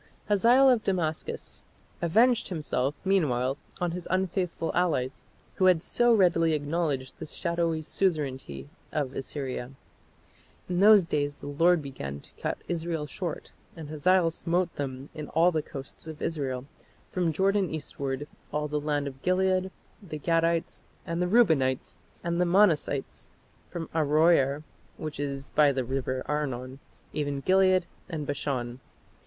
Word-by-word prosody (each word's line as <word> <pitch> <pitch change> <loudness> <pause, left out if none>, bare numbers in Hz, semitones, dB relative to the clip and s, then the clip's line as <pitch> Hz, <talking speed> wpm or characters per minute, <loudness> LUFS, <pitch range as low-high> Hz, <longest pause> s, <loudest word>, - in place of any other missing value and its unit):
Hazael 235 +6 +6
of 245 -4 +4
Damascus 165 -5 -2 0.4
avenged 230 +8 +3
himself 145 -5 -1
meanwhile 140 -8 +1 0.2
on 175 -2 0
his 175 0 -6
unfaithful 185 -2 -1
allies 150 -8 0 0.3
who 190 - +3
had 180 -3 +5
so 240 0 +2
readily 175 -6 +4
acknowledged 145 -3 -2
the 160 - -6
shadowy 170 -1 -1
suzerainty 135 - -2 0.2
of 140 -4 -1
Assyria. 135 -2 -4 1.0
"In 180 -1 -1
those 205 -2 +7
days 145 -3 -1
the - - -11
Lord 165 +3 +3
began 70 - -6
to - - -17
cut - - -1
Israel 165 -2 -2
short: 165 +3 -5 0.2
and 160 -3 -8
Hazael 165 +3 +3
smote 170 +1 -1
them 135 -1 -5
in 155 -2 -6
all 170 +3 +3
the 160 -2 0
coasts 135 +2 -9
of 155 -1 -7
Israel; 135 -5 -2 0.5
from 175 -3 +1
Jordan 195 +3 +2
eastward, 140 -2 -4 0.2
all 150 0 -1
the 150 0 -2
land 145 -1 0
of 135 -1 -7
Gilead, 185 +1 +2 0.3
the 165 -6 -7
Gadites, 165 +2 0 0.2
and 170 0 -2
the 180 - +2
Reubenites, 160 - +3 0.3
and 170 +1 0
the - - +4
Manassites, 170 -7 +2 0.4
from 165 -2 -5
Aroer, 150 -2 +3 0.3
which 155 -3 -6
is 140 -1 -4
by 150 -2 +5
the 130 -1 -1
river 130 0 -2
Arnon, 135 -3 -3 0.3
even 145 -2 -1
Gilead 185 +1 +4 0.2
and 155 -4 -4
Bashan." 130 -4 -3
160 Hz, 140 wpm, -28 LUFS, 140-180 Hz, 1.0 s, those